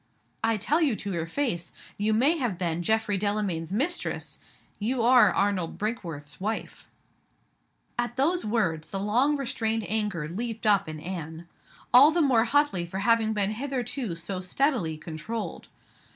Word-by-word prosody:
"I 225 -1 +2
tell 300 - +1
you 280 -8 +3
to 200 -1 -5
your 165 -1 -2
face 175 -6 -2 0.2
you 210 +2 0
may 260 +10 +4
have 240 - -1
been 170 -2 -1
Geoffrey 220 +1 +1
Delamayn's 200 -5 -1
mistress; 290 - -1 0.4
you 235 +3 0
are 240 -4 +6
Arnold 195 -4 0
Brinkworth's 170 -10 -5
wife." 220 +3 -4 1.1
At 240 0 -1
those 340 +7 +2
words 170 -9 -1
the 195 - -3
long 245 +9 +2
restrained 225 -5 -1
anger 210 -8 -1
leaped 225 +6 -5
up 200 -4 +3
in 155 -1 -6
Anne 165 -1 -6 0.5
all 265 +5 +9
the 330 +2 +1
more 255 -7 +4
hotly 285 -8 +2
for 170 +3 -6
having 225 +1 +2
been 205 -1 +1
hitherto 245 -4 -3
so 185 +3 -4
steadily 185 - 0
controlled. 170 +9 -6
215 Hz, 150 wpm, -27 LUFS, 175-240 Hz, 1.1 s, all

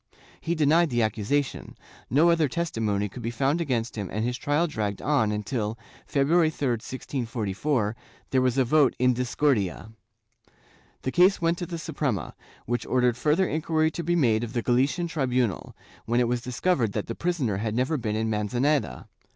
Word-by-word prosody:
He 170 - -1
denied 160 +2 +3
the 120 -2 +1
accusation; 110 +6 -2 0.3
no 155 +6 +4
other 165 -3 +3
testimony 110 -10 -1
could 120 +5 -9
be 115 - -2
found 135 +7 0
against 120 -7 -1
him 100 -4 -4
and 110 +2 -1
his 125 0 -1
trial 145 +5 +1
dragged 105 - -3
on 135 -7 +1
until, 105 +1 -2 0.3
February 155 +4 +3
3, 145 -3 -2
1644, 115 -1 -2 0.4
there 130 - +3
was 130 0 +1
a 130 - +4
vote 145 +1 +3
in 125 0 +3
discordia. 120 -5 0 1.1
The 130 - -1
case 185 +5 +4
went 170 0 +1
to 175 - -4
the 170 - -5
Suprema, 140 - -3 0.3
which 120 +1 -2
ordered 125 -2 +2
further 155 +9 +2
inquiry 160 0 0
to 170 - -5
be 175 +2 +1
made 120 -8 +2
of 115 0 -5
the 120 -2 -1
Galician 135 +8 +1
tribunal, 125 - -1 0.3
when 120 +1 +2
it 120 - +2
was 120 0 -1
discovered 125 - 0
that 105 - -2
the 115 - -4
prisoner 145 - -1
had 110 +1 -2
never 130 +6 +1
been 110 -6 -2
in 110 +1 0
Manzaneda. 110 - 0
125 Hz, 175 wpm, -26 LUFS, 110-155 Hz, 1.1 s, no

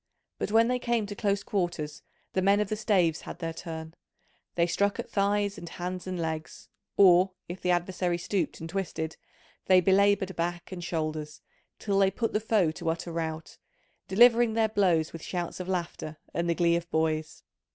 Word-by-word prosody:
But - - -2
when 225 +1 +5
they 250 0 0
came 235 -3 0
to 205 0 -7
close 200 -1 0
quarters 170 -6 -2 0.3
the 190 - +1
men 200 +2 +4
of 210 -2 0
the 215 - 0
staves 185 -7 +2
had - - -8
their 165 -2 -4
turn: 160 -1 -7 0.6
they 170 - +3
struck 200 +4 +1
at - - -4
thighs 200 0 +1
and 170 - -8
hands 180 +1 -5
and 185 -1 -3
legs, 160 -1 -5 0.3
or, 185 -1 +6
if 175 +2 -7
the 180 - -1
adversary 175 0 0
stooped 185 +2 -2
and 165 - -6
twisted, 165 -3 -3 0.5
they 185 -1 +7
belaboured 195 0 +3
back 175 +2 -3
and 180 -2 -6
shoulders, 155 -3 -3 0.3
till 200 -2 0
they 195 -1 +5
put 225 +4 -2
the 210 - +2
foe 210 -6 +2
to 165 +1 -4
utter 170 +1 -3
rout, 160 -1 -4 0.5
delivering 235 +2 +5
their 220 -1 +3
blows 180 -7 +2
with 165 - -7
shouts 175 +1 -4
of 185 - -5
laughter 170 -4 -3 0.2
and 170 0 -1
the 170 - +2
glee 170 -1 +3
of 170 0 -3
boys. 155 -1 -1
180 Hz, 185 wpm, -28 LUFS, 165-200 Hz, 0.6 s, they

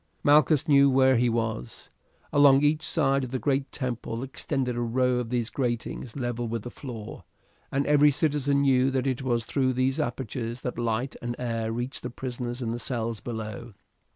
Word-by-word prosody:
Malchus 150 +1 +4
knew 140 -2 +6
where 130 0 +4
he 120 +1 +3
was. 115 - -3 0.4
Along 145 -1 +6
each 150 +1 +3
side 140 -3 +1
of 130 - -4
the 130 - -2
great 135 +1 -1
temple 120 -2 -4
extended 135 -1 -2
a 120 - -2
row 125 +1 +1
of 120 -2 -4
these 120 -2 -1
gratings 120 -2 -3
level 120 -3 -2
with 115 -1 -3
the 120 - -7
floor, 115 -6 -8 0.5
and 140 +1 0
every 150 0 +5
citizen 145 -1 +1
knew 135 -1 +3
that 130 -1 -1
it 130 -1 -1
was 120 -3 0
through 130 0 +1
these 130 +2 0
apertures 120 0 -3
that 125 -1 -4
light 120 +3 -1
and 120 0 -3
air 115 -2 -2
reached 120 +3 -4
the 125 - -4
prisoners 125 0 -5
in 115 - -2
the 120 - -3
cells 115 -2 -2
below. 110 0 -6
125 Hz, 180 wpm, -27 LUFS, 120-135 Hz, 0.5 s, knew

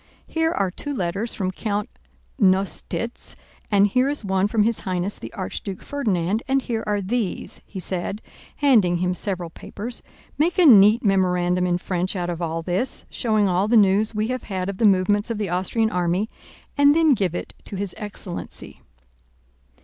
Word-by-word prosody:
Here 325 0 0
are 195 - 0
two 290 +9 -5
letters 195 +3 -2
from 185 -2 -1
Count 205 +1 -2 0.5
Nostitz 195 +4 0 0.3
and 200 -1 +5
here 255 +6 +2
is 290 -6 -3
one 190 0 +2
from 215 0 +2
His 225 0 +1
Highness 185 +1 -2
the - - -8
Archduke 190 -1 -5
Ferdinand 210 -7 -1
and 270 0 +3
here 225 -2 -2
are 205 -1 0
these," 210 0 -3
he 195 - -7
said, 185 +2 -3 0.4
handing 225 -12 +4
him 180 +1 0
several 180 -3 -3
papers, 235 +8 -7 0.4
"make 335 +4 +2
a 365 - +5
neat 220 -2 +7
memorandum 180 -2 +2
in 175 0 +1
French 180 +1 -2
out 175 -1 -2
of 170 0 -5
all 165 0 -2
this, 185 +9 -2
showing 215 -3 +1
all 185 +2 +1
the 235 +1 +4
news 210 +2 +3
we 215 +2 0
have 255 -1 -2
had 185 -1 -2
of 195 - -6
the 225 - +3
movements 205 +2 +3
of 230 - -2
the 205 -3 -2
Austrian 190 +5 0
army, 180 +3 0 0.5
and 285 0 +5
then 320 -3 +5
give 190 -7 0
it - - -5
to - - -7
his 195 -1 -3
excellency." 205 -4 -7
200 Hz, 175 wpm, -23 LUFS, 185-225 Hz, 0.5 s, neat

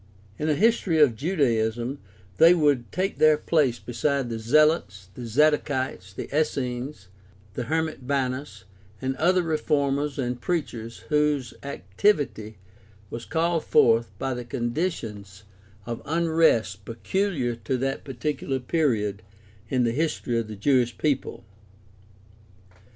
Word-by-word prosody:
In 155 - -1
a 150 - +3
history 200 -4 +2
of 140 -7 +5
Judaism 120 - 0 0.4
they 170 +2 +7
would 145 -7 +1
take 190 +2 -2
their 155 -1 +6
place 150 -6 +1
beside 135 0 -1
the 115 - -3
Zealots, 110 - +2
the 120 -2 -7
Zadokites, 130 -6 +1
the - - -5
Essenes, 130 -6 -2 0.5
the 125 - -4
hermit 160 -4 -2
Banus, 130 -5 -2 0.4
and 130 0 -2
other 180 +3 +3
reformers 145 -3 0
and 125 -2 -2
preachers 120 -10 -3
whose 150 -5 +1
activity 110 - -1 0.5
was 115 0 -6
called 165 +1 0
forth 115 0 +4
by 135 +4 -2
the 125 0 -5
conditions 120 - -4 0.4
of 120 -1 -5
unrest 160 - +2
peculiar 130 - -1
to 130 +2 -2
that 135 +2 -2
particular 135 +1 -3
period 115 - 0 0.5
in 130 -2 +2
the 115 - +2
history 130 -4 -1
of 115 - -4
the 110 - -7
Jewish 120 +2 +1
people. 145 -3 -1
135 Hz, 125 wpm, -25 LUFS, 115-155 Hz, 0.5 s, they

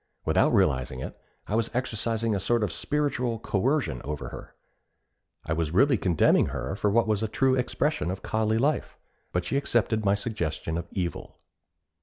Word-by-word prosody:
Without - - +3
realizing 65 0 +1
it, - - -6 0.3
I - - -5
was 115 0 +2
exercising 115 -2 0
a 100 - 0
sort 120 +3 +1
of 105 - -1
spiritual 140 -5 -1
coercion 110 - 0
over 75 +1 -4
her. - - -10 0.9
I 80 - -1
was 80 -1 -1
really 135 +5 +5
condemning 90 -6 +3
her 65 +9 -4
for 105 - +1
what 115 +2 +3
was 105 -1 +1
a 110 - 0
true 130 +4 +2
expression 130 - 0
of 95 +1 -4
collie 110 0 +1
life; 140 +6 0 0.3
but 90 -1 -1
she 135 - 0
accepted 115 -5 +1
my 100 0 +3
suggestion 85 -7 -3
of 85 - -3
evil. 90 -5 -4
110 Hz, 170 wpm, -27 LUFS, 85-120 Hz, 0.9 s, really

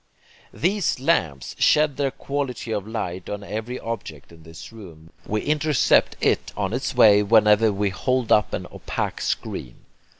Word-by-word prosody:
These 190 -4 0
lamps 80 - 0
shed 150 -2 +3
their 140 -1 +1
quality 135 -4 -4
of 105 -2 -3
light 95 -5 -5
on 105 0 -5
every 110 +5 -5
object 85 -12 -7
in 85 -1 -16
this 80 +7 -12
room. 85 -7 -13 0.2
We 105 0 -1
intercept 150 -2 +2
IT - - +1
on 100 0 -2
its 130 +1 -3
way 105 -4 +6
whenever 105 +1 +4
we 100 0 -1
hold 125 +4 -1
up 105 -2 +4
an 90 - -4
opaque - - -4
screen. - - -4
110 Hz, 155 wpm, -23 LUFS, 95-130 Hz, 0.2 s, way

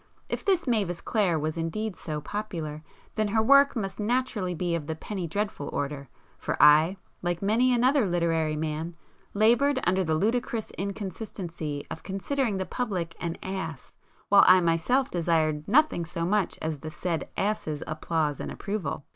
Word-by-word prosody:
If - - -3
this 380 -3 +2
Mavis 200 - 0
Clare 200 -8 +1
was 155 +1 -2
indeed 185 +6 -2
so 150 -2 -5
'popular,' 165 -7 -5 0.3
then 215 -1 0
her 220 +2 +2
work 280 +4 +6
must 195 -3 -3
naturally 215 -5 0
be 175 0 -1
of 160 -3 -2
the 160 - -2
'penny 185 +1 -5
dreadful' 200 -4 -3
order, 140 -2 -3 0.3
for - - -2
I, 155 +6 +6 0.2
like 175 +1 -2
many 230 +5 +3
another 250 0 +3
literary 165 -3 +1
man, 155 +2 -3 0.4
laboured 240 +6 +4
under 185 +2 +2
the 160 -2 0
ludicrous 225 +4 -1
inconsistency 190 -6 -5
of 160 - -6
considering 210 +3 -1
the 190 - -2
public 185 -10 -3
an 170 -1 -3
'ass' 175 -7 -5 0.4
while 200 0 +8
I 185 0 +8
myself 175 +11 +1
desired 160 -3 +1
nothing 255 - +3
so 170 0 -3
much 200 0 +1
as 155 -2 -2
the 155 - -6
said 165 -1 -3
'ass's' 195 -7 -1
applause 155 -2 -1
and - - -4
approval! 195 -9 -4
180 Hz, 160 wpm, -27 LUFS, 160-215 Hz, 0.4 s, while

